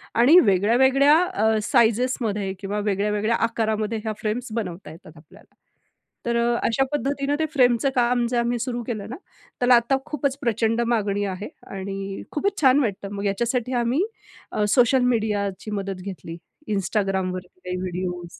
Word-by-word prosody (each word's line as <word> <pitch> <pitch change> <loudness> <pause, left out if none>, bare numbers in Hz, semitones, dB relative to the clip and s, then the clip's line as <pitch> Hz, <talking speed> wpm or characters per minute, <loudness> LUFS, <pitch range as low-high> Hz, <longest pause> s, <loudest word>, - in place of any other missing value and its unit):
आणि 275 +10 +7
वेगळ्या-वेगळ्या 265 - +4
अ, 220 -12 +1
साइजेसमध्ये 220 -3 +1
किंवा 200 +1 -3
वेगळ्या-वेगळ्या 210 +2 0
आकारामध्ये 220 -1 -1
ह्या 220 -1 -2
फ्रेम्स 230 +4 -2
बनवता 185 -7 -5
येतात 160 0 -14
आपल्याला. 150 0 -19 0.7
तर 235 0 0
अ, 235 0 +2
अशा 250 +4 +2
पद्धतीनं 280 0 -1
ते 315 - +2
फ्रेमचं 250 -1 +3
काम 245 -1 +2
जे 245 - -1
आम्ही 240 0 0
सुरु 240 +1 -3
केलं 215 -3 -4
ना, 250 - -5 0.4
त्याला 245 0 +5
आता 235 +3 +2
खूपच 285 -3 -2
प्रचंड 230 -2 +1
मागणी 205 -3 0
आहे 195 +1 -4 0.3
आणि 195 0 -5
खूपच 400 +6 -1
छान 265 0 +5
वाटतं. 200 -6 -2
मग 200 0 -4
याच्यासाठी 235 +5 -1
आम्ही 255 +9 +1 0.5
अ, 210 - 0
सोशल 250 +2 +4
मीडियाची 205 -2 -2
मदत 195 -2 -4
घेतली, 180 -4 -7 0.3
Instagramवर 195 -2 -1
काही 180 0 -6
व्हिडिओस 180 -1 -5
220 Hz, 145 wpm, -23 LUFS, 195-245 Hz, 0.7 s, आणि